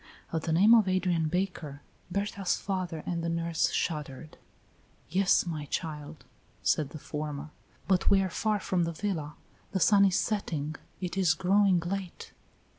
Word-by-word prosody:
At 160 - 0
the 165 - -2
name 200 +8 +6
of 220 -4 +6
Adrian 180 -3 +1
Baker, 165 -5 -3 0.3
Berta's 200 0 -1
father 185 -5 -3
and 170 -2 -2
the 170 - -1
nurse 165 -1 0
shuddered. 150 -2 -3 0.7
"Yes, 190 +1 +3
my 155 -4 -4
child," 150 0 -5 0.4
said 150 -3 +2
the 155 - -8
former, 150 0 -5 0.4
"but 190 -2 +3
we 200 - +5
are - - 0
far 215 +2 0
from 180 -3 0
the 170 - -3
villa, 160 -5 -3 0.4
the 190 - +1
sun 200 +3 +5
is 190 -2 +3
setting 160 -8 -2 0.3
it 180 +1 -3
is 175 -4 +3
growing 190 +1 +3
late." 185 +1 -5
175 Hz, 155 wpm, -29 LUFS, 155-195 Hz, 0.7 s, name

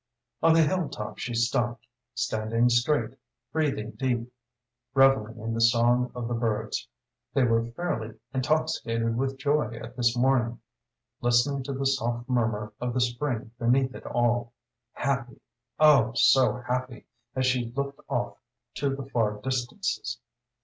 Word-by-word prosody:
On 165 0 +6
the 165 - +6
hill 170 -1 0
top 105 -6 -6
she 120 - -3
stopped, 120 -1 0 0.3
standing 115 +2 +1
straight, 120 +5 +2 0.4
breathing 140 -9 -1
deep, 125 -2 -2 0.6
revelling 135 -5 +4
in 115 +1 -4
the 115 - -1
song 120 +1 +4
of 120 -1 -3
the 120 - -2
birds 110 -2 -1 0.5
they 135 - +4
were 115 -1 +2
fairly 115 -10 -3 0.2
intoxicated 130 -5 0
with 135 +2 -1
joy 140 -4 0
at 120 +1 -9
this 120 -1 +2
morning 120 -2 +2 0.6
listening 120 +3 +2
to 140 - -3
the 135 +1 -3
soft 120 -2 0
murmur 110 -4 0
of 125 0 -2
the - - +2
spring 120 -1 -1
beneath 130 +2 +2
it - - -9
all 120 0 0 0.4
happy 135 -2 -2 0.4
oh 140 -7 +6
so 130 +1 +5
happy, 125 -1 -3 0.3
as 130 0 +1
she 125 -1 +2
looked 140 +2 -3
off - - -2 0.3
to 135 0 -1
the 135 -1 -6
far 110 -6 0
distances. 125 - -2
120 Hz, 140 wpm, -27 LUFS, 115-135 Hz, 0.6 s, On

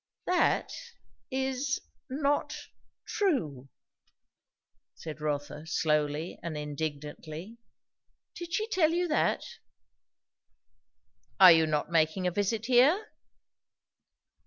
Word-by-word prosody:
"That 360 0 +2 0.6
is 265 0 -1 0.3
not 290 +2 0 0.5
true!" 155 - -1 1.3
said 155 -2 -8
Rotha 150 +1 -3
slowly 150 0 0
and 165 -2 -5
indignantly. 155 +6 -6 0.7
"Did 345 -1 -8
she 435 +5 -1
tell 330 -7 +2
you 355 +1 +1
that?" 310 - +1 2.0
"Are 185 -2 +10
you 160 -1 +5
not 150 +1 -1
making 165 +3 +2
a 180 - +2
visit 205 +4 -1
here?" 280 - +4
180 Hz, 85 wpm, -29 LUFS, -, 2.0 s, Are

